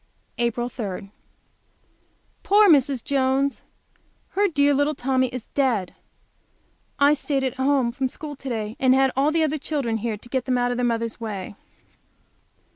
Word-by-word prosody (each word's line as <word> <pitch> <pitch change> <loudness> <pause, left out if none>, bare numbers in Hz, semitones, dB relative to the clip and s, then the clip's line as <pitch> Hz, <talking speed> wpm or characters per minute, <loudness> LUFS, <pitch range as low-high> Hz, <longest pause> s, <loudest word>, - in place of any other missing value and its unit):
April 240 0 0
3. 200 -5 -6 1.3
Poor 415 +1 +5
Mrs. 275 - +3
Jones! 275 0 0 0.7
Her 405 +1 +2
dear 285 -4 +3
little 285 +2 +1
Tommy 260 0 +1
is 250 -2 -7
dead! 240 -10 0 1.0
I 285 +1 +5
stayed 280 -2 -1
at 260 -1 -2
home 265 -2 +2
from 260 +2 -1
school 295 +3 -7
to 270 - -7
day 220 -2 -3
and 260 -1 +4
had 265 0 +3
all 275 +3 +3
the 320 +1 +2
other 310 0 -1
children 270 -7 -2
here 220 -1 -3
to 220 - -14
get 260 -1 -1
them 255 -1 +1
out 245 0 +1
of 245 - -2
their 245 - 0
mother's 230 -1 -2
way. 205 -4 -5
260 Hz, 160 wpm, -23 LUFS, 235-285 Hz, 1.3 s, Poor